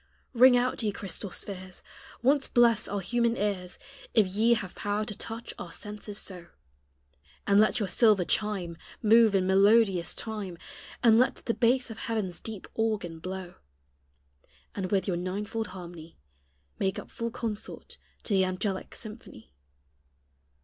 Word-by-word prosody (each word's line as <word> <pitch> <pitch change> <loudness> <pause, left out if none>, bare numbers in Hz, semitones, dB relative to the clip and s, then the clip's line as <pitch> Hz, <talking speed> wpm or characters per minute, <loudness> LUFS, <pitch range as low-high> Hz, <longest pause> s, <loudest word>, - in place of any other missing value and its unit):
Ring 250 +1 +7
out, 250 +1 0
ye 215 -2 0
crystal 200 -1 -2
spheres! 185 -1 -7 0.4
Once 275 +2 +3
bless 240 -2 +4
our 200 0 -2
human 235 +4 +1
ears, 190 -3 -2 0.4
If 220 -3 +6
ye 215 +5 +3
have 190 -5 -5
power 205 +1 -2
to 210 - -6
touch 225 +3 -7
our 170 - -7
senses 210 +2 -6
so; 180 -4 -6 1.0
And 200 0 +5
let 215 - +4
your 205 - 0
silver 210 -2 +4
chime 190 -6 -1 0.3
Move 220 -1 +6
in 185 -1 +3
melodious 195 -1 +4
time, 210 -6 -5 0.5
And 230 -1 +6
let 255 - +1
the 230 - +1
bass 245 +1 +2
of 225 - -8
heaven's 210 -6 -3
deep 220 -4 -6
organ 210 -7 -1
blow; 185 +1 -6 1.2
And 190 -2 -3
with 195 0 +1
your 180 -3 0
ninefold 205 +5 -3
harmony 175 -3 -10 0.6
Make 190 -1 0
up - - -8
full 230 0 -3
consort 225 -3 -6 0.2
to 215 - -2
the 190 -1 +4
angelic 190 +1 -3
symphony. 210 - -11
205 Hz, 145 wpm, -28 LUFS, 185-225 Hz, 1.2 s, Ring